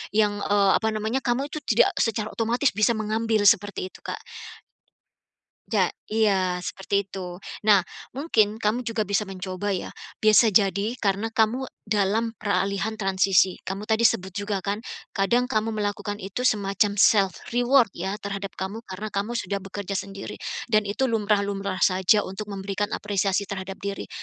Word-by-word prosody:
yang, 210 -1 +2
eee, 200 -1 +3
apa 220 - -1
namanya 220 +4 -1
kamu 265 +3 -1
itu 305 - -4
tidak 225 - +4
secara 215 -1 0
otomatis 235 +5 +1
bisa 215 +4 +2
mengambil 220 0 0
seperti 205 -2 +3
itu - - -15
Kak. - - -6 1.5
Ja - - +2 0.2
iya 195 -5 +2
seperti 200 +1 -1
itu. 180 -2 -7 0.3
Nah 200 -3 +6 0.3
mungkin 220 -8 +2
kamu 225 +3 0
juga 225 -1 0
bisa 200 +1 +1
mencoba 190 +1 -4
ya, 180 - -5 0.3
biasa 215 +1 +6
jadi 200 +3 +2
karena 205 0 0
kamu 225 +4 +1 0.2
dalam 220 +2 +1
peralihan 200 0 0
transisi. 190 -1 +3
Kamu 195 +2 -4
tadi 220 +1 +2
sebut 190 -3 +2
juga 205 -1 -2
kan 205 +2 -2 0.3
kadang 235 +5 +2
kamu 220 -1 0
melakukan 205 0 -2
itu 195 +5 -4
semacam 205 -2 +1
self 195 -1 +4 0.2
reward 245 -1 +4
ya, 190 +4 -3
terhadap 200 -2 -5
kamu 200 +5 -4
karena 195 +3 -6
kamu 200 +4 -1
sudah 200 -1 -2
bekerja 195 0 -5
sendiri 195 0 -5 0.3
dan 215 -2 +3
itu 265 +6 0
lumrah-lumrah 200 -4 0
saja 190 +3 +3
untuk 205 +2 -6
memberikan 200 +1 -3
apresiasi 200 -1 0
terhadap 195 -1 -6
diri. 200 0 -5
205 Hz, 150 wpm, -25 LUFS, 195-220 Hz, 1.5 s, Nah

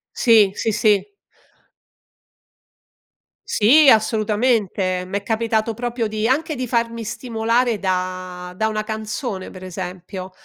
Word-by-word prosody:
Sì, 220 -5 +5
sì, 225 - -1
sì. 210 - +1 2.3
Sì, 275 +7 +5
assolutamente. 215 -4 +1
M'è 200 +2 -3
capitato 225 0 0
proprio 240 0 -2
di 215 +1 -1
anche 305 +5 0
di 255 -1 -4
farmi 230 -1 -1
stimolare 230 0 -1
da 185 -1 -3
da 220 +4 0
una 215 -1 -2
canzone 215 -2 -5
pre 185 0 -10
esempio, 185 +1 -7
220 Hz, 110 wpm, -21 LUFS, 190-230 Hz, 2.3 s, Sì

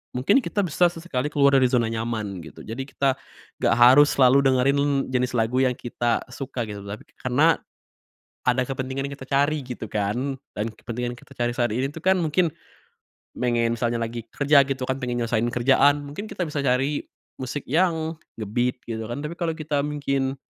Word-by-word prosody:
mungkin 125 - +4
kita 210 -5 -1
bisa 175 0 +3
sesekali 165 -6 -3
keluar 140 -2 +4
dari 130 - +4
zona 120 -3 +1
nyaman, 110 -4 -3
gitu. 80 - -11
Jadi 130 +5 -6
kita 135 -1 0 0.4
nggak - - +3
harus 130 +5 +7
selalu 135 +1 +5
dengerin 140 +1 +2
jenis 125 -1 0
lagu 115 +2 +1
yang 130 -1 +2
kita 120 -1 -1
suka 130 -2 -4
gitu, 100 -1 -7
tapi 100 +2 -7 0.2
karena 145 +6 +3 0.9
ada 125 +1 +3
kepentingan 130 +1 -3
yang - - -6
kita 135 -1 -11
cari, 145 +2 +2
gitu 125 -3 -6
kan. 120 +7 -1 0.2
Dan 105 - -1
kepentingan 120 +2 -5
yang - - -15
kita - - -17
cari 120 0 0
saat 120 0 +1
ini 135 +4 -1
tuh 160 - -8
kan 190 0 +4
mungkin, 170 +2 +2 0.9
pengen 120 -1 +1
misalnya 120 0 -1
lagi 115 0 -4
kerja 140 0 +5
gitu 135 -1 -3
kan, 130 - 0
pengen 125 -2 -2
nyelesein 115 0 0
kerjaan, 140 +4 +3
mungkin 145 +8 -6
kita 180 -4 -3
bisa 145 -2 -3
cari 135 +3 +1 0.4
musik 130 +2 -4
yang 160 +1 +1 0.2
nge-beat, 120 +4 -1
gitu 110 -1 -4
kan. 120 +4 -4
Tapi 150 +3 -5
kalo 170 -2 0
kita 155 -2 -2
mungkin, 140 -2 -1
130 Hz, 180 wpm, -24 LUFS, 120-145 Hz, 0.9 s, harus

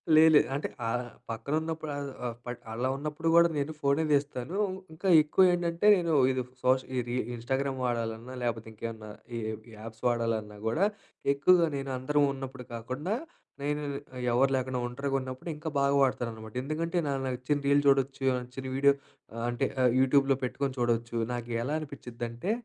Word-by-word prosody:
లే 155 - +8
లే. 150 - +9
అంటే 145 - -1 0.2
ఆహ్, 125 +2 0 0.3
పక్కన 115 +6 -4
ఉన్నప్పుడు 160 -1 -4 0.3
ఆహ్, 120 -1 -3
ప - - -11 0.3
అలా 125 +3 -1
ఉన్నప్పుడు 150 +3 -3
కూడా 170 0 +8
నేను 145 +2 -1
ఫోనే 140 +3 +2
తీస్తానూ. 145 +2 0 0.4
ఇంకా 160 +5 -4
ఎక్కువ 150 +5 +3
ఏంటంటే 170 +1 -1
నేను 175 -3 -1
ఏదో - - +3 0.2
ఇది 130 -1 0 0.2
సోష్ 130 +1 +4
ఈ - - +2
రీ 120 - -2 0.2
ఇన్స్టాగ్రామ్ 130 +3 -2
వాడాలన్నా 115 0 -2
లేకపోతే 115 -2 -2
ఇంకేమన్నా 110 0 -6 0.3
ఈ - - -2 0.4
యాప్స్ 110 0 -10
వాడాలన్నా 115 -3 -1
కూడా 160 - +2 0.5
ఎక్కువగా 170 +5 +5
నేను 135 0 -4
అందరం 145 +3 +2
ఉన్నప్పుడు 135 -1 -7
కాకుండా 130 - -3 0.5
నేను 150 +1 -1 0.4
ఇ - - -4
ఎవరు 135 +3 +4
లేకుండా 130 -1 -1
ఒంటరిగా 135 +3 -2
ఉన్నప్పుడు 130 +5 -6
ఇంకా 155 +2 -5
బాగ 140 0 +3
వాడతాననమాట. 115 -4 -2
ఎందుకంటే 165 +5 -2
నాకు 135 -1 -1
నచ్చిన 130 +3 -1
రీల్ 140 0 +5
చూడొచ్చు. 135 0 +2 0.2
నచ్చిన 125 +2 -8
వీడియో 140 +1 +6 0.4
ఆహ్, 115 - -4
అంటే 120 0 0 0.3
యూట్యూబ్‌లో 135 +1 +4
పెట్టుకొని 135 +2 -2
చూడొచ్చు. 120 -1 0 0.2
నాకు 120 -1 -4
ఎలా 140 +5 -2
అనిపించిద్దంటే 125 - -5
130 Hz, 160 wpm, -29 LUFS, 120-145 Hz, 0.5 s, లే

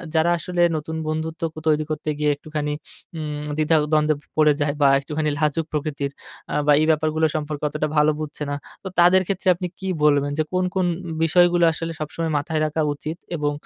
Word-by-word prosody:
যারা 165 +2 +3
আসলে 175 +1 -2 0.2
নতুন 160 +1 -5
বন্ধুত্বকত 160 +1 -3
তৈরি 155 0 +3
করতে 155 0 -3
গিয়ে 150 -1 +2
একটুখানি 150 0 -4 0.4
উম 150 -1 -4
দ্বিধা-দ্বন্দ্বে 155 -1 +2 0.2
পড়ে 150 -1 +5
যায় 145 0 +1
বা 140 - +6
একটুখানি 150 +2 -2
লাজুক 155 +1 +1
প্রকৃতির 145 -2 -2 0.4
আ - - -1
বা - - +6
এই - - +3
ব্যাপারগুলো 155 0 +1
সম্পর্কে 150 -1 -3
অতটা 150 +1 -2
ভালো 150 +1 +5
বুঝছে 150 -1 -5
না। 145 - -1 0.3
তো 190 - -5
তাদের 180 +2 +6
ক্ষেত্রে 195 0 -3
আপনি 180 +1 -4
কি 190 - -5 0.2
বলবেন 145 -1 +3
যে, 155 - +2
কোন, 185 0 +2
কোন 185 -1 +2 0.4
বিষয়গুলো 175 +1 +4
আসলে 165 +1 -4
সবসময় 160 +1 -3
মাথায় 155 +2 -1
রাখা 155 +1 -1
উচিত? 155 +3 -6 0.2
এবং 145 -1 0
155 Hz, 180 wpm, -22 LUFS, 150-165 Hz, 0.4 s, বা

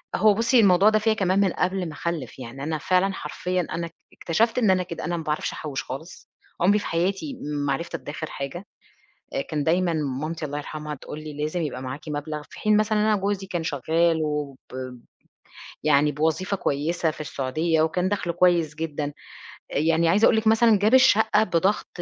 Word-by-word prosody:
هو 210 +1 +5
بُصي 235 +3 +3
الموضوع 195 0 +6
ده 215 0 +3
فيّا 220 0 +2
كمان 195 -2 +1
من 195 -3 +3
قبل 185 -1 -1
ما - - -8
أخلف، 150 -6 -4
يعني 130 +3 -8
أنا 155 +1 -1
فعلًا 185 +4 +1
حرفيًا 180 0 -2
أنا 170 0 -2
اك - - -18 0.2
اكتشفت 225 +8 0
إن 220 -6 +4
أنا 185 -1 +2
كده، 170 -3 -6
أنا 175 0 -1
ما 165 - -5
باعرفش 150 -1 -2
أحوش 145 -3 -4
خالص، 155 +8 -9 0.3
عُمري 205 +4 +4
في - - -7
حياتي 195 - -1
ما 145 -1 -1
عرفت 170 +3 -4
أتدخر 155 +1 -6
حاجة، 140 +8 -6 0.7
آآ، 275 - 0
كان 150 - -3
دايمًا 175 +1 +2
مامتي 155 +2 -3
الله 145 0 -3
يرحمها 150 0 -6
تقول 150 +2 -9
لي 155 - -6
لازم 155 +3 -1
يبقى 130 -4 -4
معاكِ 130 +3 -5
مبلغ 150 +1 -4
في - - -12
حين 215 0 +3
مثلًا 215 0 +2
إن - - +2
أنا 215 -1 +3
جوزي 195 -1 -1
كان 175 -3 -3
شغال 160 +2 +1
وب 150 -3 -2 1.3
يعني 150 0 +4
بوظيفة 160 +6 0
كويسة 160 +3 0
في 155 - -9
السعودية 155 +4 0
وكان 180 +4 +1
دخله 185 -4 -1
كويس 170 -4 +2
جدًا، 150 -2 -3 0.6
يعني 165 +2 +2
عايزة 205 +6 +4
أقول 220 - +5
لِك 220 0 0
مثلًا 220 -2 +5
جاب 215 +4 +2
الشقة 220 -4 +5
بضغط 185 +2 +1
170 Hz, 190 wpm, -24 LUFS, 150-195 Hz, 1.3 s, الموضوع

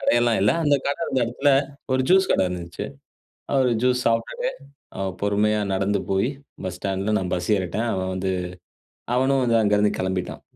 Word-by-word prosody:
கடையெல்லாம் 120 -1 +3
இல்ல. 105 - +4
அந்த 145 - +4
கடை 140 +3 -1
இருந்த 135 -4 0
எடத்தில 125 +5 +1 0.4
ஒரு 130 0 +2
ஜூஸ் 190 0 +5
கடை - - +3
இருந்துன்ச்சு. 90 +2 -5 0.7
அ - - -3
ஒரு 125 - +2
ஜூஸ் 125 0 +2
சாப்ட்டுட்டு, 115 - 0 0.5
அ - - -3 0.2
பொறுமையா 105 +1 +2
நடந்து 100 +1 0
போயி, 95 +6 +2 0.3
பஸ் 90 -1 -4
ஸ்டாண்ட்ல 100 +2 -1
நான் 90 -2 -3
பஸ் 90 +3 -2
ஏறிட்டேன். 95 +5 -2
அவன் 95 0 -2
வந்து, 95 0 -1 0.8
அவனும் 130 +1 +2
வந்து 115 -1 +3
அங்கருந்து 105 0 +3
கெளம்பிட்டான். 95 -1 -3
105 Hz, 165 wpm, -23 LUFS, 95-125 Hz, 0.8 s, ஜூஸ்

